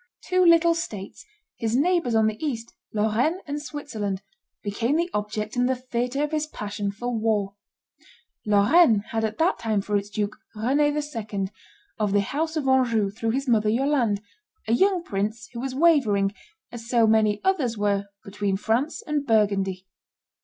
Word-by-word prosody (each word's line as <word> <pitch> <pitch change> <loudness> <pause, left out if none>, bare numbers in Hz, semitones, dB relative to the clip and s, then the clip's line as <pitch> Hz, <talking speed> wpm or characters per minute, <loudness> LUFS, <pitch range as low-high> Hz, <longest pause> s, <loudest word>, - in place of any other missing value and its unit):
Two 365 0 +3
little 335 -1 +6
states, 210 -12 -6 0.3
his 225 0 0
neighbors 315 -4 +2
on 220 -1 +4
the 220 +5 -2
east, 235 -6 -3 0.2
Lorraine 220 - +1
and 290 0 -4
Switzerland, 220 -11 -4 0.4
became 225 +7 0
the 340 +2 0
object 210 +1 -3
and 245 +1 +2
the 260 - +2
theatre 250 +2 -2
of 300 - -2
his 305 -1 -1
passion 205 -6 -4
for 240 +4 -4
war. 215 -3 0 0.9
Lorraine 210 +4 +5
had 225 -1 -1
at 220 0 -2
that 330 +3 +2
time 220 -3 0
for 205 +1 -2
its 200 0 -1
duke 205 0 -2 0.2
Rene 275 +7 +2
II., 215 -9 -4 0.5
of 210 -2 0
the 205 - +4
house 315 +9 -2
of 285 -3 -1
Anjou 230 -6 +3
through 225 +2 -3
his 270 +4 -1
mother 215 -3 +3
Yolande, 235 -4 +1 0.4
a 225 - +2
young 375 +6 +3
prince 215 -1 -3
who 235 - -5
was 260 +1 -4
wavering, 245 -11 +3 0.4
as 235 -1 -9
so 235 -2 +4
many 215 -1 +3
others 275 - +1
were, 200 -1 0 0.2
between 200 -1 -2
France 250 - -1
and 300 -3 -2
Burgundy. 195 -4 +1
225 Hz, 165 wpm, -25 LUFS, 210-285 Hz, 0.9 s, little